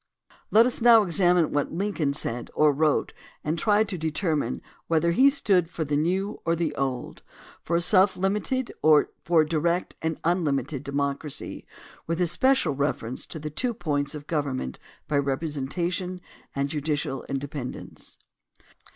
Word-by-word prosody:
Let 225 Hz, +2 st, +6 dB
us 250 Hz, -1 st, +1 dB
now 230 Hz, -2 st, +7 dB
examine 175 Hz, -2 st, +3 dB
what 145 Hz, -1 st, -1 dB
Lincoln 175 Hz, -5 st, -1 dB
said 120 Hz, -4 st, -3 dB
or 150 Hz, -1 st, +4 dB
wrote 150 Hz, +1 st, +1 dB, 0.3 s
and 155 Hz, +2 st, -1 dB
try 210 Hz, 0 st, +3 dB
to 200 Hz, -4 st, -5 dB
determine 155 Hz, -, -1 dB, 0.2 s
whether 165 Hz, +1 st, +2 dB
he 265 Hz, +10 st, +6 dB
stood 195 Hz, -, +2 dB
for 165 Hz, -2 st, -3 dB
the 145 Hz, 0 st, -1 dB
new 185 Hz, +7 st, -1 dB
or 165 Hz, -, +1 dB
the 165 Hz, -3 st, -1 dB
old; 135 Hz, -3 st, -3 dB, 0.4 s
for 170 Hz, 0 st, 0 dB
self 190 Hz, +2 st, +4 dB
limited 210 Hz, +7 st, -1 dB
or 155 Hz, -1 st, +5 dB
for 165 Hz, -2 st, +4 dB
direct 170 Hz, +3 st, 0 dB
and 160 Hz, -1 st, -2 dB
unlimited 150 Hz, -6 st, 0 dB
democ 140 Hz, 0 st, -1 dB
racy 150 Hz, -3 st, -7 dB, 0.4 s
with 165 Hz, +1 st, -1 dB
especial 180 Hz, -, +2 dB
reference 135 Hz, -3 st, -2 dB
to -, -, -7 dB
the 150 Hz, 0 st, -6 dB
two 240 Hz, -, -2 dB
points 145 Hz, -7 st, -2 dB
of 145 Hz, -1 st, -8 dB
gov 150 Hz, -2 st, -1 dB
ernment 130 Hz, -, -4 dB, 0.3 s
by 145 Hz, -, +1 dB
representation 160 Hz, +6 st, -2 dB, 0.4 s
and 140 Hz, 0 st, -1 dB
judicial 145 Hz, -3 st, -2 dB
independence. 140 Hz, -1 st, -6 dB
160 Hz, 150 wpm, -26 LUFS, 145-185 Hz, 0.4 s, now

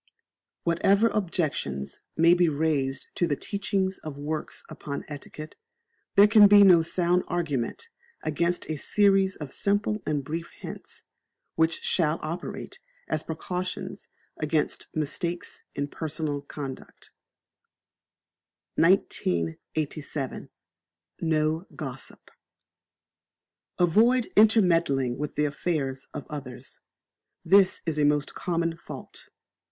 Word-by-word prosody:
Whatever 195 Hz, +6 st, +3 dB
objections 155 Hz, -, -2 dB, 0.2 s
may 165 Hz, +1 st, +6 dB
be 175 Hz, -1 st, +4 dB
raised 145 Hz, -3 st, -1 dB
to 175 Hz, -, +1 dB
the 145 Hz, -, +1 dB
teachings 195 Hz, +1 st, -2 dB
of 155 Hz, -3 st, -7 dB
works 150 Hz, +2 st, -4 dB
upon 140 Hz, -1 st, -6 dB
etiquette, 150 Hz, +1 st, -9 dB, 0.6 s
there 200 Hz, -, +9 dB
can 210 Hz, -1 st, +8 dB
be 205 Hz, 0 st, +8 dB
no 180 Hz, -4 st, +7 dB
sound 175 Hz, +2 st, +1 dB
argument 165 Hz, -, -2 dB, 0.4 s
against 170 Hz, +3 st, 0 dB
a 155 Hz, -, -3 dB
series 195 Hz, +3 st, +3 dB
of 145 Hz, -4 st, -8 dB
simple 205 Hz, +1 st, 0 dB
and 145 Hz, -2 st, 0 dB
brief 165 Hz, +4 st, -4 dB
hints, -, -, -9 dB, 0.5 s
which 160 Hz, 0 st, +1 dB
shall 160 Hz, -2 st, +2 dB
operate 170 Hz, -, -5 dB, 0.3 s
as 155 Hz, -, -1 dB
precautions 180 Hz, +3 st, -5 dB, 0.3 s
against 155 Hz, 0 st, -1 dB
mistakes 165 Hz, +3 st, -3 dB
in 145 Hz, 0 st, -1 dB
personal 155 Hz, -1 st, -3 dB
conduct. 140 Hz, -2 st, -8 dB, 1.7 s
1987. 145 Hz, -, 0 dB, 0.7 s
No 160 Hz, +2 st, +1 dB
Gossip. -, -, -7 dB, 1.5 s
Avoid 225 Hz, +8 st, +3 dB
intermeddling 170 Hz, -, +4 dB
with 150 Hz, 0 st, -4 dB
the 150 Hz, -, +2 dB
affairs 145 Hz, -3 st, -2 dB
of -, -, -6 dB
others. 130 Hz, -3 st, -8 dB, 0.6 s
This 190 Hz, +2 st, +5 dB
is 155 Hz, -3 st, -1 dB
a -, -, +3 dB
most 145 Hz, 0 st, +2 dB
common 170 Hz, -2 st, -1 dB
fault. -, -, -10 dB
160 Hz, 105 wpm, -27 LUFS, 145-180 Hz, 1.7 s, there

